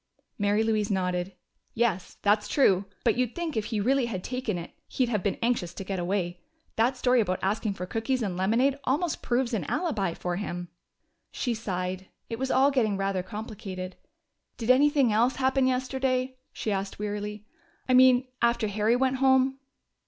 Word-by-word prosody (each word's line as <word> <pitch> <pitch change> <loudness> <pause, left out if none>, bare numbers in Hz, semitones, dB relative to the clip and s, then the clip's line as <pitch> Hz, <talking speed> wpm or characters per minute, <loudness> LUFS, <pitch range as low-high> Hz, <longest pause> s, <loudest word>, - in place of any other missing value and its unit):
Mary 205 +2 +2
Louise 215 -2 +1
nodded. 180 -1 -1 0.4
"Yes, 220 -6 0
that's 210 +1 +3
true. 200 -9 +3 0.2
But 230 -2 +2
you'd 250 -2 0
think 340 -3 -3
if 220 -2 -1
he 215 -1 -2
really 255 +4 +2
had 190 -6 -4
taken 250 -6 -2
it 170 - -7 0.2
he'd 255 -3 0
have 210 -5 0
been 200 - -1
anxious 215 -8 0
to - - -5
get 190 -1 -3
away. 175 -1 -2 0.3
That 245 +4 +2
story 250 -1 +3
about 185 -4 0
asking 205 +1 0
for 180 - -5
cookies 225 +6 -1
and 190 -4 -2
lemonade 235 +9 +2
almost 295 +5 0
proves 245 0 0
an 205 -6 0
alibi 220 - -1
for 175 -1 -3
him." 175 -3 -4 0.6
She 245 - -1
sighed; 185 -3 -3 0.2
it 230 - -4
was 265 0 -1
all 270 +2 +4
getting 220 -7 +1
rather 195 -1 0
complicated. 195 -2 -7 0.6
"Did 235 +1 +2
anything 275 -3 +4
else 235 +4 +3
happen 265 0 +2
yesterday?" 260 0 0
she 215 - -3
asked 195 0 -3
wearily. 210 0 -4 0.4
"I 255 - +2
mean, 255 0 +6 0.2
after 235 -2 +2
Harry 215 +3 +2
went 260 +1 +1
home?" 265 0 +3
220 Hz, 175 wpm, -27 LUFS, 195-255 Hz, 0.6 s, mean